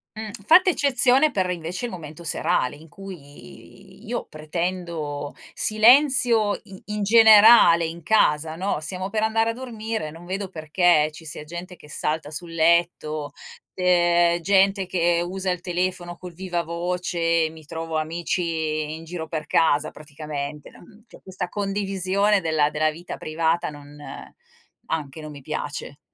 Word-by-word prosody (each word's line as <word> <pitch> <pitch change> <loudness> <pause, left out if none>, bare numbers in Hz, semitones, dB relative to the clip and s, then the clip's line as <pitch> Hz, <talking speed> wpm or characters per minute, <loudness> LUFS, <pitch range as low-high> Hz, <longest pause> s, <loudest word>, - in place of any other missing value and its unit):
Mh, 215 -1 -6 0.2
fatta 370 +4 +7
eccezione 275 0 +3
per, 185 -4 -1
invece, 180 +6 -4
il 235 - -5
momento 160 -1 -9
serale, 125 -5 0
in 155 +2 -16
cui 150 - -13
io - - -3
pretendo 160 -2 -4 0.2
silenzio 235 -1 +4
i 190 -1 -13
in 210 0 -3
generale 215 -5 +7
in 165 +1 -6
casa, 155 -5 +2
no? 185 -2 -2
Stiamo 185 +5 -5
per 215 - -1
andare 225 +1 +1
a - - -7
dormire, 225 -7 -5
non 165 +3 -12
vedo 190 +1 -4
perché 155 -1 +2
ci 160 - -13
sia 150 -1 -7
gente 175 +3 -8
che 150 - -17
salta 150 0 -3
sul 165 +2 -6
letto, 160 -3 +1 0.4
ehm, 175 -1 +3
gente 195 0 +2
che 170 -2 +1
usa 185 +1 -3
il 180 -1 -4
telefono 180 -1 -3
col 180 -1 -10
vivavoce, 170 -1 -1
mi 160 0 -14
trovo 165 0 -4
amici 160 -1 -2
in 160 - -10
giro 165 -1 -6
per 155 -1 -4
casa, 155 -2 +2
praticamente. 150 -1 -7
Mhmm 210 +5 -18
cioè, - - -16
questa 190 -1 -5
condivisione 195 0 0
della 155 -2 +1
della 155 +1 +1
vita 170 +3 -8
privata 160 +2 -1
non 145 -1 -12 0.9
anche, 155 -2 -4
non 155 - -8
mi 145 -1 -11
piace. 145 0 -5
175 Hz, 145 wpm, -23 LUFS, 155-195 Hz, 0.9 s, fatta